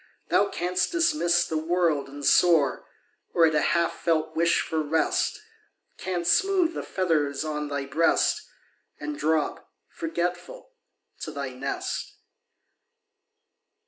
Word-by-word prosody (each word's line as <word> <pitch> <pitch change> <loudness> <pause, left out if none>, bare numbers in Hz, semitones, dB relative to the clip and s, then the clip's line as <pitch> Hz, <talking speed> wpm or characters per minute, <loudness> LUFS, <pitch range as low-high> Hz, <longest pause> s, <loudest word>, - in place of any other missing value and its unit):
Thou 200 - +3
canst 180 - -1
dismiss 305 - +2
the 160 - -2
world 165 -3 +1
and 140 +1 -8
soar, 160 -7 +3 0.5
Or, 170 - +6
at 155 - +2
a 150 - +2
half 170 -1 +2
felt 160 -1 0
wish 170 +1 +3
for 160 -1 -2
rest. 160 - 0 0.6
Canst 175 -2 0
smooth 375 -4 +1
the - - -4
feathers 155 -6 -1
on 150 -1 -3
thy 140 -1 -3
breast, 155 +5 +2 0.6
And 300 - -4
drop, 160 - -1 0.2
forgetful, 180 - -4 0.5
to - - -5
thy 140 -2 -4
nest. 130 +2 -4
165 Hz, 120 wpm, -26 LUFS, 150-180 Hz, 0.6 s, Or